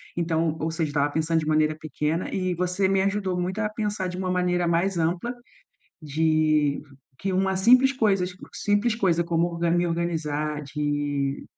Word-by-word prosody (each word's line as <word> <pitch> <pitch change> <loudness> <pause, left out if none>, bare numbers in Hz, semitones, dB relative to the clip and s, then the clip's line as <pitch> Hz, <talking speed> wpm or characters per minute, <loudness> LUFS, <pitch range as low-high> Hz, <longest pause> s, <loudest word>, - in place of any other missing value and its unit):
então, 165 -2 0
ou 160 +2 -1
seja 160 -1 -1
estava 145 0 0
pensando 160 +1 +1
de 155 - -4
maneira 155 0 +2
pequena 155 +2 -2
e 185 -2 -1
você 180 +2 0
me 195 0 +2
ajudou 195 -2 -1
muito 185 +3 -2
a 215 -1 0
pensar 210 -3 -2
de 180 - -5
uma 185 -1 -2
maneira 180 -1 +1
mais 175 +3 +1
ampla, 175 +8 -1 0.7
de 155 -1 +2 0.4
que 195 - -2
uma 190 +1 +1
simples 250 +7 +5
coisas 195 -8 +1 0.2
simples 205 +2 +1
coisa 175 -6 +2
como 170 0 +1
orga 170 0 -1
me 175 +1 +2
organizar, 155 -3 -2
de 145 -1 -2
170 Hz, 165 wpm, -25 LUFS, 155-190 Hz, 0.7 s, simples